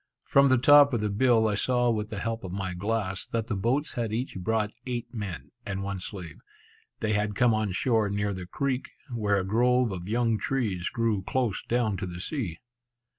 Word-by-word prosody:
From 140 0 +4
the 130 - +5
top 145 +2 +7
of 115 - 0
the 105 -1 0
bill, 115 +1 +3
I 105 - +1
saw 120 +3 +2
with 105 -1 -2
the 105 - -5
help 115 +2 -3
of 95 - -6
my 95 -1 -3
glass, 100 0 -2
that 115 -1 -2
the 115 - -2
boats 125 +9 0
had 115 -3 -2
each 120 +4 -3
brought 110 +2 0 0.2
eight 120 -1 -4
men, 100 -7 -6
and 100 -3 -4
one 100 -1 -3
slave. 90 -4 -7 0.6
They 110 -1 +1
had 105 0 0
come 120 0 +4
on 110 -2 0
shore 110 +1 +2
near 100 0 -1
the 90 -2 -7
creek, 135 +5 -2 0.2
where 105 -3 +1
a 95 - -2
grove 120 +3 +3
of 90 0 -6
young 115 -1 +1
trees 105 -10 -1
grew 115 -4 0
close 120 +1 -1
down 115 -4 0
to 95 - -4
the 85 0 -7
sea. 95 - -3
110 Hz, 205 wpm, -27 LUFS, 100-120 Hz, 0.6 s, top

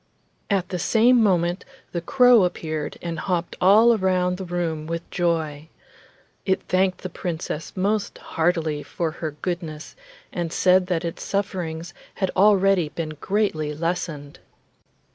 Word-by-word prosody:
At 195 -3 0
the 180 - -3
same 230 +7 +4
moment 175 -3 +2 0.3
the 170 - -3
crow 245 +2 +5
appeared 155 -4 -3
and 170 -2 -3
hopped 175 -2 -2
all 220 +5 +6
round 180 -1 +1
the 190 - -6
room 170 -3 -3
with 165 0 -4
joy. 160 -4 -1 0.7
It 190 -1 0
thanked 185 0 +1
the - - -4
Princess 165 -2 -5
most 205 +2 0
heartily 160 -3 -1
for 165 +2 -3
her 155 -2 -5
goodness, 165 -4 -4 0.4
and 170 -2 -3
said 185 +1 +3
that 175 -2 -1
its 165 - -5
sufferings 175 -4 -3 0.2
had 190 -1 -1
already 195 -4 +4
been 160 +1 -4
greatly 160 -8 0
lessened. 165 -3 -3
175 Hz, 135 wpm, -23 LUFS, 160-190 Hz, 0.7 s, all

